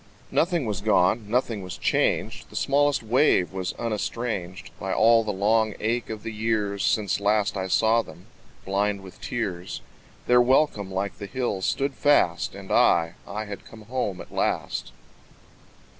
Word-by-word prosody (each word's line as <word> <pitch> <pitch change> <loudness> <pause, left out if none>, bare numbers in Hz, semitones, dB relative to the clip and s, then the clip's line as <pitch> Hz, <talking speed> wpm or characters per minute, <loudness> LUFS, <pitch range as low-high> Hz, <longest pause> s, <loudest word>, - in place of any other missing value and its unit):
Nothing 170 -4 +1
was 105 -2 -3
gone, 105 +1 +2
nothing 115 -3 0
was 90 -2 -7
changed, - - 0
The - - -14
smallest 145 -1 +2
wave 110 -5 +3
was 95 -1 -3
unestranged 105 -5 -3
By 95 - -3
all 115 +2 +5
the 110 - -2
long 110 +2 +1
ache 115 +2 -1
of 110 -2 -6
the 115 - -5
years 105 -2 -1
Since 100 -5 +1
last 105 +1 +1
I 95 -1 -2
saw 110 +4 +3
them, - - -13 0.4
blind 100 +1 0
with 95 -1 -13
tears. 95 -7 -4 0.4
Their 125 0 +5
welcome 120 -6 +2
like 95 +1 -3
the 100 - -6
hills 100 -4 -2
stood 140 0 0
fast: 140 - +2
And - - -9
I, 85 0 +4
I 105 +2 -4
had 100 -1 -8
come 110 -1 -13
home 105 -5 -3
at - - -13
last. - - -1
105 Hz, 160 wpm, -25 LUFS, 95-115 Hz, 0.4 s, all